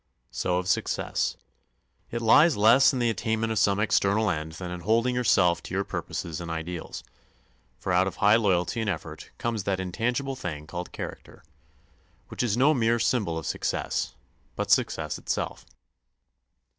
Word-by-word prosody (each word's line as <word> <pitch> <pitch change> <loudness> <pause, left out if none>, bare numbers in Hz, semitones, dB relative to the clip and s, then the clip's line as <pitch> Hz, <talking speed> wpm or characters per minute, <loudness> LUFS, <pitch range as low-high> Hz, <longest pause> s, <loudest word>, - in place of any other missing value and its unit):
So 90 -1 -1
of 90 0 -2
success. 95 - -1 0.7
It 115 0 -4
lies 145 +7 +6
less 115 +6 +6
in 130 - -3
the 120 -2 +2
attainment 110 +1 -1
of 110 - +1
some 100 0 +3
external 105 0 +2
end 80 +1 -4
than 90 +2 -6
in 90 - -5
holding 115 +7 +1
yourself 90 -8 +3
to 95 - -6
your 100 - +1
purposes 85 -4 -5
and 85 - -6
ideals; 80 +1 -5 0.7
for 95 - -2
out 90 +1 +3
of 95 - -4
high 105 +2 +5
loyalty 100 0 +1
and 110 - -1
effort 80 -3 -6
comes 115 -4 -2
that 95 -1 0
intangible 120 +9 -2
thing 75 - -6
called 90 +2 -6
character, - - -8 0.9
which - - -4
is 120 -3 0
no 140 +5 +5
mere 120 -3 +2
symbol 105 -8 0
of 80 - -5
success, - - -2 0.4
but - - -2
success 80 -1 +1
itself. - - -4
100 Hz, 160 wpm, -26 LUFS, 90-115 Hz, 0.9 s, lies